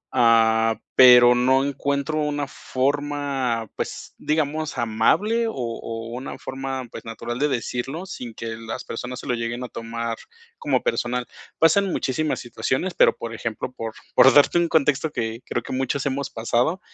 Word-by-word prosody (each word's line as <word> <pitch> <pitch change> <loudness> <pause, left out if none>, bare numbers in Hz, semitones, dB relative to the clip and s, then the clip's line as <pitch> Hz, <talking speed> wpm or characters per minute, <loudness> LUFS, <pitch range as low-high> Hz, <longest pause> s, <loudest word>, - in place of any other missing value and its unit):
Ah, 115 -1 +4 0.2
pero 125 -1 +9
no 130 +2 +3
encuentro 140 +2 -1
una 145 -1 -1
forma, 135 -4 -1
pues - - -5
digamos 155 -1 -1
amable, 160 - +2
o 225 - -3
o 115 -2 -5
una 130 +2 -6
forma, 130 -1 -5
pues - - -8
natural 115 +2 -5
de 145 - +3
decirlo 135 +5 -3
sin 125 -11 -8
que 115 -1 -5
las 115 0 -6
personas 125 +2 -6
se - - -12
lo 125 - +1
lleguen 120 +1 -3
a 125 - -6
tomar 115 0 -4 0.4
como - - 0
personal. 125 - -1 0.3
Pasan 190 +4 +4
muchísimas 155 +2 -1
situaciones, 130 +8 -2
pero, - - +4
por 115 0 -6
ejemplo, 115 +2 -4
por 115 -3 -5 0.2
por 135 - +7
darte 145 +4 +6
un 170 - +2
contexto 150 0 +2
que 115 -3 -3
creo - - -2
que - - -6
muchos 130 +1 -1
hemos 140 0 -2
pasado. 120 +9 0
130 Hz, 160 wpm, -23 LUFS, 115-145 Hz, 0.4 s, pero